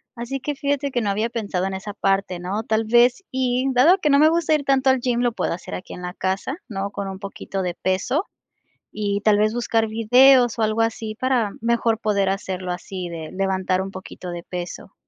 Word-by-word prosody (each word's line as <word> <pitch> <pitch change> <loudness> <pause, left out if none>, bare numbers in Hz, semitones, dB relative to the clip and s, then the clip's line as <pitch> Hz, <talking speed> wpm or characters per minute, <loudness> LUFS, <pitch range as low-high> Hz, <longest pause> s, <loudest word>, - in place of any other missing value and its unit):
Así 240 +3 -4
que 295 +2 -3
fíjate 280 0 -1
que 245 - 0
no 210 - -1
había 215 +4 0
pensado 205 -6 -2
en 195 - -4
esa 195 +2 -6
parte, 195 -3 0
¿no? 190 +5 -3
Tal 220 0 0
vez, 240 - +4
y 255 0 0
dado 300 +10 +6
que 305 - +1
no 280 0 +5
me 310 +1 +7
gusta 330 -1 +1
ir 290 -2 -2
tanto 270 -1 +3
al 260 - +1
gym, 240 -1 0
lo 245 -1 +2
puedo 225 - -2
hacer 175 +1 -8
aquí 180 - -7
en - - -8
la 180 0 -5
casa, 190 - -2
¿no?, 200 -4 -4
con 200 -1 -4
un 190 0 -6
poquito 195 -1 -5
de 175 -1 -3
peso, 190 - 0 0.7
y 205 -1 -2
tal 210 -1 +4
vez, 215 +1 +2
buscar 225 -2 +1
videos, 245 +3 +5
o - - +1
algo 215 +1 +1
así 225 -1 -2
para 245 -3 +1
mejor 230 -1 +1
poder 200 -3 +1
hacerlo 185 -2 -3
así 180 0 -5
de 160 -2 -7
levantar 190 -1 0
un 195 0 -5
poquito 185 -1 -9
de 175 -1 -6
peso. 180 +2 -7
215 Hz, 220 wpm, -22 LUFS, 190-245 Hz, 0.7 s, me